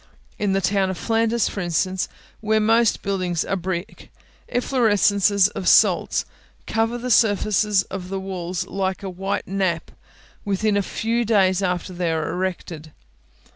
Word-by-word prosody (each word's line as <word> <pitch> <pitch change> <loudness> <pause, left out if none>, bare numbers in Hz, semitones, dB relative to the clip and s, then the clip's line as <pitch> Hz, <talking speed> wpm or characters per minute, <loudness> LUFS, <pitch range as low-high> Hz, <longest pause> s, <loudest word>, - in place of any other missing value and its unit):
In 205 -2 +1
the 195 - +1
town 195 +1 +1
of 190 - -4
Flanders, 225 0 +1
for - - -5
instance, 180 +2 -1 0.3
where 220 0 +1
most 225 +1 +2
buildings 185 -4 -1
are - - -10
of 190 - -2
brick, 180 0 -5 0.4
effloresences 205 -5 +3
of 190 - -5
salts - - +4 0.4
cover 225 +2 0
the 250 +1 -4
surfaces 210 -2 +3
of 185 -1 -7
the 195 0 -3
walls, 185 -2 -4
like 190 0 -3
a 195 - -4
white 195 +2 -3
nap, 185 -4 -1 0.5
within 205 +1 0
a 200 - +2
few 230 +4 -1
days 195 -4 +2
after 180 0 -2
they 175 -1 -1
are 160 -1 -1
erected. 175 -4 -4
195 Hz, 150 wpm, -22 LUFS, 185-215 Hz, 0.5 s, salts